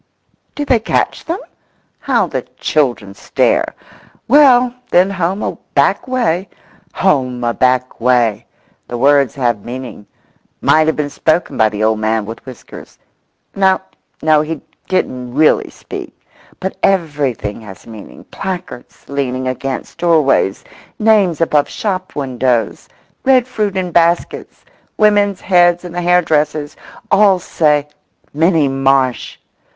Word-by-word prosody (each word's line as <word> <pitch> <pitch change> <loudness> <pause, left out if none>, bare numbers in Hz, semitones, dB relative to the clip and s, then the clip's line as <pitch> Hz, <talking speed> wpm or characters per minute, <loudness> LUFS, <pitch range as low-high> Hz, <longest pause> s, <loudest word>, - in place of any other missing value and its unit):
Do 290 - -3
they 255 -4 +3
catch 220 - -1
them? 335 +2 -2 0.6
How - - +1
the - - -3 0.2
children 120 -9 0
stare! - - 0 0.5
Well, 255 -2 +5 0.2
then 185 +2 +3
home 190 +1 -2
a - - -4 0.2
back - - +2
way—"Home 180 - -2
a 120 0 0
back 130 -1 0
way!" 120 -3 +1 0.4
The 120 - -5
words 140 -1 +3
have 120 -6 -1
meaning; 125 -4 -8 0.5
might 155 0 +3
have 160 - +1
been 145 -1 -3
spoken 160 +4 0
by 110 -1 +3
the 105 0 -3
old 110 0 +2
man 110 0 0
with 115 +2 -9
whiskers—no, 190 +8 -4 0.4
no, 155 -1 +4
he 155 0 -4 0.3
didn't 125 -9 -2
really 155 +1 +3
speak; - - -9 0.4
but 190 - -4
everything 145 - -1
has 95 -4 -12
meaning—placards 125 - -8
leaning 130 -2 -2
against 130 +1 -5
doorways—names 170 - +1
above 150 -3 +2
shop 185 -3 -4
windows—red 130 - -1
fruit 210 -6 -2
in 180 -2 -2
baskets—women's 200 +4 0
heads 175 -1 +3
in 175 - -7
the 175 +1 -3
hairdresser's—all 170 +3 +1
say 150 -4 +1 0.5
"Minnie 160 -1 +2
Marsh!" 135 -1 0
150 Hz, 115 wpm, -16 LUFS, 125-185 Hz, 0.6 s, Well